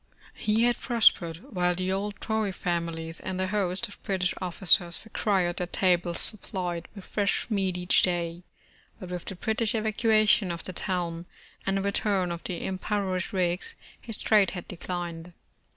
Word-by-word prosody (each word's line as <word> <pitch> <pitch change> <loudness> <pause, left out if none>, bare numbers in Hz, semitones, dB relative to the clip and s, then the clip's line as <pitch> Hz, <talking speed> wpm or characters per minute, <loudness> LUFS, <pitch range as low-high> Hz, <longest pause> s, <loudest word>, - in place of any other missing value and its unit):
He 215 +2 +1
had 240 0 +2
prospered, 220 - +2
while 180 -1 +2
the 185 +1 -1
old 200 +2 -2
Tory 220 -2 -1
families 170 -2 -3
and 185 0 -4
a 185 - +1
host 195 +2 +2
of 205 - -15
British 185 -2 0
officers 175 -1 +4
required 195 -5 0
their 180 - -1
tables 175 -1 +1
supplied 180 -5 -3
with 195 - -10
fresh 200 -2 0
meat 190 -3 0
each 180 +1 +3
day, 175 -1 -1 0.6
but 185 - -8
with 180 -1 -5
the 195 - -5
British 220 +3 0
evacuation 215 -3 +3
of 170 -1 -5
the 185 - -6
town, 175 -2 -3 0.4
and 195 0 +2
the 195 - -1
return 200 -2 +1
of 170 0 -5
the 180 -3 -4
impoverished 190 -1 -2
Whigs, 185 - -1 0.3
his 225 -2 -6
trade 210 -3 +4
had 175 - -7
declined. 175 -1 -5
185 Hz, 160 wpm, -27 LUFS, 175-205 Hz, 0.6 s, officers